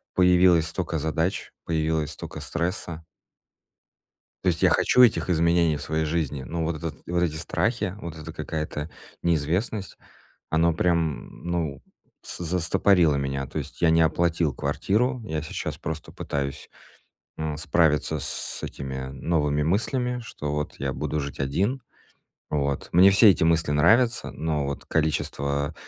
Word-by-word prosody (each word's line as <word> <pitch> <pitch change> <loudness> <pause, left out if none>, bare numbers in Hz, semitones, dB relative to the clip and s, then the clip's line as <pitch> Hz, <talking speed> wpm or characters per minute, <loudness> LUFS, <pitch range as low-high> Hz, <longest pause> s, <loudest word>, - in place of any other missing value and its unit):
появилось 90 -2 +5
столько 85 -1 -2
задач, 80 +4 -1
появилось 80 -2 0
столько - - -8
стресса. 85 -1 -3 1.4
То - - -5
есть 85 -2 0
я - - +6
хочу 125 - +4
этих 115 -5 +4
изменений 85 -2 +3
в 75 - -7
своей 80 +1 -1
жизни. 75 -4 -2
Но 80 +4 -3
вот 80 0 -1
этот 80 0 -5
вот 85 0 0
эти 80 -3 0
страхи, 100 +5 -1
вот 85 -1 -7
эта 80 +1 -8
какая-то 75 -1 -4 0.3
неизвестность, 85 +6 -1 0.5
оно 80 +1 +3
прям, 80 -6 -1
ну, 80 -5 -2 0.4
с - - -5
застопорило 85 -1 +3
меня. 70 -1 -2
То - - -4
есть - - -8
я 85 - +5
не 80 0 +4
оплатил 80 -1 +2
квартиру, 115 - 0
я 80 -7 -2
сейчас 80 - -5
просто 80 0 -6
пытаюсь, 70 -1 -4 0.7
м, 80 -1 -3
справиться 80 -1 +2
с - - -3
этими 65 -1 -5
новыми 75 +1 0
мыслями, 125 - 0
что 75 -9 -5
вот 75 0 -3
я 70 0 -2
буду 75 - -3
жить 70 0 -6
один. 100 - 0 0.7
Вот. 70 -2 -1
Мне 95 +3 +7
все 100 +2 +7
эти 80 - +2
мысли 80 -2 +2
нравятся, 115 +11 +3
но 75 -3 -1
вот 70 - -5
количество 70 -2 -1
80 Hz, 145 wpm, -25 LUFS, 75-85 Hz, 1.4 s, Мне